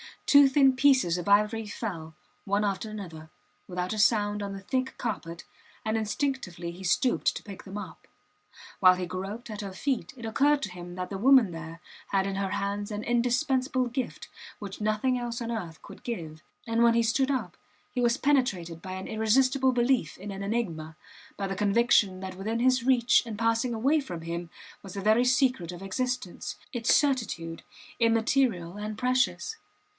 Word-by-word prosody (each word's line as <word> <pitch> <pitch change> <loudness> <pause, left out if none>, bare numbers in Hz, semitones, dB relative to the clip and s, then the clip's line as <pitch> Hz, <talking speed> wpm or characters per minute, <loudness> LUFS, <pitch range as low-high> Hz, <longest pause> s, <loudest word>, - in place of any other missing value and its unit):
Two 285 -1 +7
thin 270 -1 +4
pieces 260 -11 +4
of 175 - -6
ivory 210 +2 +3
fell, 165 -8 -6 0.3
one 200 +1 +1
after 200 +1 -2
another, 165 -7 -8 0.4
without 180 +1 -3
a 215 - -3
sound, 210 -1 +3
on 200 -1 -4
the 195 - -7
thick 260 +6 -2
carpet, 175 -8 -4 0.4
and 220 0 0
instinctively 215 - -2
he 180 +3 -11
stooped 240 +7 +2
to - - -6
pick 200 -3 -10
them 195 +1 -7
up. 205 - -9 0.7
While 185 -1 +7
he 180 0 -3
groped 195 +7 -6
at 210 -1 -5
her 195 -2 -6
feet 260 +5 -2
it 235 - -8
occurred 280 +6 +2
to 190 - -3
him 175 0 -9
that 180 0 -4
the 195 - -3
woman 255 -4 +6
there 165 0 -8 0.3
had 195 -1 +1
in 195 -1 -2
her 195 -1 -2
hands 205 +1 -2
an 210 0 -4
indispensable 255 +2 +1
gift 255 +2 -4 0.3
which 200 -2 -8
nothing 215 +4 +1
else 235 -1 -4
on 235 0 -3
earth 175 -8 -5
could 195 - -12
give; 160 -10 -6 0.2
and 230 0 0
when 235 0 +6
he 235 - +3
stood 260 +4 +1
up 265 -2 -2 0.4
he 250 - -1
was 240 +1 +3
penetrated 195 - 0
by 185 - -6
an 190 0 -6
irresistible 255 +4 +2
belief 240 - +1
in 200 +2 -7
an 195 0 -6
enigma, 175 -8 -3 0.4
by 200 - -2
the 195 0 -3
conviction 205 -2 +3
that 190 -1 -6
within 220 +5 -2
his 255 0 +3
reach 245 -2 +4
and 220 -3 -6
passing 230 +2 +1
away 270 +8 +2
from 180 - -6
him 170 +1 -5 0.3
was 195 -2 -10
the 200 - -4
very 220 +5 +4
secret 250 - +2
of 180 +1 -9
existence 250 -1 -3 0.2
its 235 -2 +3
certitude, 225 - 0 0.4
immaterial 225 -5 +2
and 210 0 -5
precious! 255 - 0
215 Hz, 180 wpm, -28 LUFS, 190-250 Hz, 0.7 s, Two